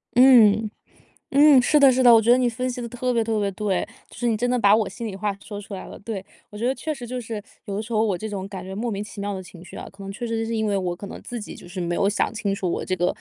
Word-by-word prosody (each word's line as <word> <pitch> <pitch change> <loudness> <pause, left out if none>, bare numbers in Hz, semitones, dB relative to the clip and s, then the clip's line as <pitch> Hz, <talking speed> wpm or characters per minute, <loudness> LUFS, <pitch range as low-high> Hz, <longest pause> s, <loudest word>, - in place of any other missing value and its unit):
嗯， 225 -4 +6 0.6
嗯， 285 -1 +7
是 300 +4 +3
的 275 -2 +7
是 260 +1 +2
的， 240 -1 +8
我 225 - +7
觉 225 - 0
得 245 - +7
你 250 -1 +2
分 250 +2 -2
析 250 - -5
得 235 - -4
特 250 +2 -2
别 230 -2 +1
特 220 -1 -1
别 200 -1 0
对， 195 -1 -1 0.3
就 - - -13
是 240 - -2
你 225 -2 +1
真 245 +2 0
的 250 -1 +1
把 205 -1 +6
我 220 -2 +1
心 225 +4 -6
里 195 - -6
话 200 0 -2
说 205 -1 -7
出 205 0 -10
来 185 - -6
了， - - -10
对。 205 -3 -5 0.3
我 210 - -9
觉 235 +3 -1
得 260 - +2
确 310 +2 -3
实 245 -4 -8
就 250 +1 -4
是， 220 -2 -5 0.2
有 200 -3 -4
的 210 - -2
时 220 - -10
候 220 -1 +2
我 205 -4 +1
这 220 +5 -5
种 195 -2 -5
感 190 -2 -7
觉 190 +1 -7
莫 230 +3 -2
名 200 0 -3
其 210 -1 -10
妙 205 0 -3
的 190 - -5
情 180 -1 -13
绪 - - -12
啊， - - -7
可 195 0 -12
能 195 - -6
确 235 +4 -5
实 230 -1 -2
就 225 - -1
是 230 0 -2
因 220 -1 0
为 200 - +1
我 180 -2 -2
可 200 +2 -9
能 - - -8
自 245 - -6
己 - - -8
就 - - -13
是 180 0 -5
没 170 0 -1
有 200 - +2
想 210 - 0
清 215 -3 -2
楚 185 -3 -2
我 - - -3
这 185 - -1
个 175 0 +1
215 Hz, 365 characters per minute, -23 LUFS, 195-240 Hz, 0.6 s, 的